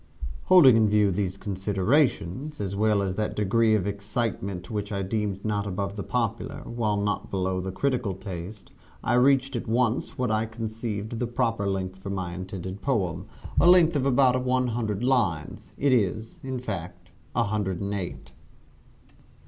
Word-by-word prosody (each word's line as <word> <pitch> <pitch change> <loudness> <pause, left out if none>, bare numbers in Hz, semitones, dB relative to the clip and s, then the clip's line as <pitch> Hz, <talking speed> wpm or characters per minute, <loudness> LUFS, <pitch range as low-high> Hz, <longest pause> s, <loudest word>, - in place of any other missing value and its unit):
Holding 165 -10 +8
in 110 -2 +4
view 105 -1 +3
these 95 0 -2
considerations, 105 - 0
as 100 -1 -3
well 105 -1 +2
as 95 -1 -1
that 105 -1 -1
degree 110 +2 +3
of 100 -4 0
excitement 100 -2 -3
which 105 -1 -3
I 100 -1 -1
deemed 100 0 -2
not 105 -1 -1
above 100 +1 -3
the 100 - -4
popular, 115 0 -2
while 110 -3 -1
not 105 0 -1
below 95 -1 -1
the 95 +1 -4
critical 125 -2 -1
taste, 95 +1 -8 0.3
I - - +1
reached 135 +1 +4
at 120 - -3
once 120 +1 0
what 125 -2 0
I 110 +1 +1
conceived 110 -1 -4
the 120 - -1
proper 115 -4 0
length 95 -1 -3
for 95 - -7
my 95 -3 -3
intended 95 +1 -6
poem 95 - -1 0.3
a 175 - +6
length 175 -3 +6
of 140 -1 +1
about 130 -1 +3
one 130 0 +1
hundred 110 -2 -2
lines. 105 - 0
It 140 -1 +3
is, 110 - 0
in 130 -1 -3
fact, 90 -6 -6 0.2
a 120 - +3
hundred 100 -4 -1
and 100 0 -3
eight. 95 -4 -5
105 Hz, 165 wpm, -26 LUFS, 95-120 Hz, 0.3 s, Holding